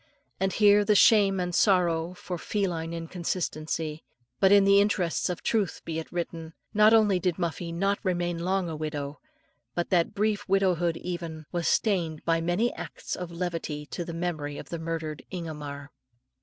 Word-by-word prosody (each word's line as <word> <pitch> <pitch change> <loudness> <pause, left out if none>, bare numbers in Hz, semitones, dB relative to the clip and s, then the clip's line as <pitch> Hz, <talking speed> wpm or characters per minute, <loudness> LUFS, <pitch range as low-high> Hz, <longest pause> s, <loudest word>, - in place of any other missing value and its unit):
And 190 0 +1
here 205 -1 +6
with 210 0 +4
shame 200 -3 +5
and 180 -1 -2
sorrow 175 -3 +2
for 180 -1 -6
female 175 -6 -2
inconstancy, 165 -2 -3 0.4
but 190 -1 +5
in 200 -1 +7
the 200 0 +6
interests 185 -6 0
of 180 - -4
truth 210 -6 0
be 160 -1 -3
it 160 - -8
written, 165 -2 -5 0.2
not 215 0 +6
only 210 -4 +5
did 180 -2 0
Muffie 170 -1 -3
not 195 +4 0
remain 175 -3 -1
long 185 +1 0
a 160 - -4
widow, 150 -2 -4 0.6
but 175 - -2
that 175 -3 +2
brief 205 -1 0
widowhood 180 -4 +2
even, 170 -3 -5
was 175 -2 -1
stained 170 -8 +1
by 165 0 +2
many 175 +8 +1
acts - - -6
of 180 -2 -6
levity 170 -4 -4
to 175 - -3
the 170 - -6
memory 155 -4 -3
of - - -9
the 170 - -4
murdered 160 -2 -4
Ingomar. 150 -5 -6
175 Hz, 170 wpm, -27 LUFS, 165-195 Hz, 0.6 s, in